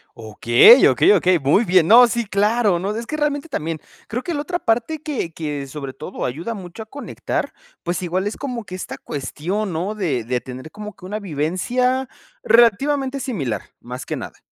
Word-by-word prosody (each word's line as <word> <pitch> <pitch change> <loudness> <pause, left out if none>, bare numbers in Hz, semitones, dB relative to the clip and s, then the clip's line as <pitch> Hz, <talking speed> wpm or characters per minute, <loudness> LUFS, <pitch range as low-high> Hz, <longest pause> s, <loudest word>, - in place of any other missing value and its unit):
Okey, 120 - +6
okey, 130 - +4
okey, 180 -2 +3
muy 145 - +3
bien. 180 -4 +3
No, 240 +3 +9
sí, 235 0 -1
claro, 205 -1 +2
no, 200 +3 -2
es 230 +2 -5
que 305 - -3
realmente 295 0 -1
también, 165 - -3 0.3
creo 240 +4 -2
que 345 - -3
la 290 - -2
otra 350 +4 -3
parte 245 +7 0
que 275 - -3
que 145 -4 -4
sobre 135 -1 -7
todo - - -6
ayuda 165 - -4
mucho 190 +2 -8
a - - -18
conectar, 280 +6 -4 0.3
pues 175 +1 -2
igual 185 +3 -1
es 210 - -3
como 245 -6 -5
que 185 - -7
esta 185 - -6
cuestión, 180 +8 -4
¿no?, 185 +7 -3
de 145 - -1
de 125 +1 -1
tener 130 +3 -9
como 210 +3 -9
que - - -13
una 205 +3 -4
vivencia 215 - -1 0.3
relativamente 265 +4 +3
similar, 135 - -3 0.2
más 125 +2 -8
que - - -4
nada. - - -8
200 Hz, 190 wpm, -21 LUFS, 155-240 Hz, 0.3 s, No